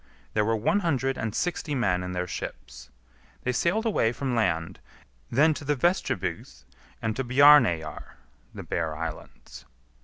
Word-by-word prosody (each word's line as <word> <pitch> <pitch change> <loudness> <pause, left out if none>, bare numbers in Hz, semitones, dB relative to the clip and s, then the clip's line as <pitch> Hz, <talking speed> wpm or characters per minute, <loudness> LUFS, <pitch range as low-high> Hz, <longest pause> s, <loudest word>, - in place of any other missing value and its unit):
There 105 - +2
were 115 +2 +1
one 115 - +1
hundred 135 -7 0
and 115 -3 -4
sixty 165 -4 -2
men 95 -8 +1
in 90 0 -5
their 90 0 -2
ships. 60 -6 -8 0.5
They 125 - 0
sailed 185 - 0
away 155 - +2
from 130 +1 -3
land; 85 -8 -1 0.5
then 155 +5 +4
to 150 - -8
the 145 +1 0
Vestribygd 130 - -2 0.4
and 110 -1 -1
to 135 - -2
Bjarneyjar 125 - +5 0.5
(the - - -8
Bear 80 -1 -2
Islands). 65 -5 -8
115 Hz, 150 wpm, -26 LUFS, 90-145 Hz, 0.5 s, Bjarneyjar